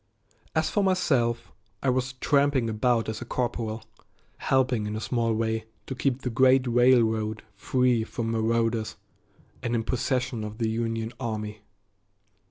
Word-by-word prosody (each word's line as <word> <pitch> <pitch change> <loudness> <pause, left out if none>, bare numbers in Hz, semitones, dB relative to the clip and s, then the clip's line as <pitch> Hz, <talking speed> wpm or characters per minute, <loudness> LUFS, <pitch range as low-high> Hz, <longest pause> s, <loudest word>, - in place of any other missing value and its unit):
As - - +2
for 205 - +2
myself, 125 -11 +1 0.3
I 135 - +3
was 125 0 -1
tramping 140 -2 +2
about 115 +1 +1
as 110 -1 -4
a - - -5
corporal, 115 -3 -2 0.5
helping 130 -5 +1
in 105 - -3
a - - -2
small 115 +2 0
way 110 0 -1 0.2
to 135 - -5
keep 130 +1 -1
the 125 - -2
great 130 +2 +4
railroad 115 -3 +3
free 125 +2 +1
from 115 0 -3
marauders 115 0 0 0.7
and 120 -2 -1
in 115 - 0
possession 125 -2 -1
of 105 0 -6
the 115 -2 0
Union 115 0 -2
army. 105 -3 -4
115 Hz, 145 wpm, -27 LUFS, 110-125 Hz, 0.7 s, great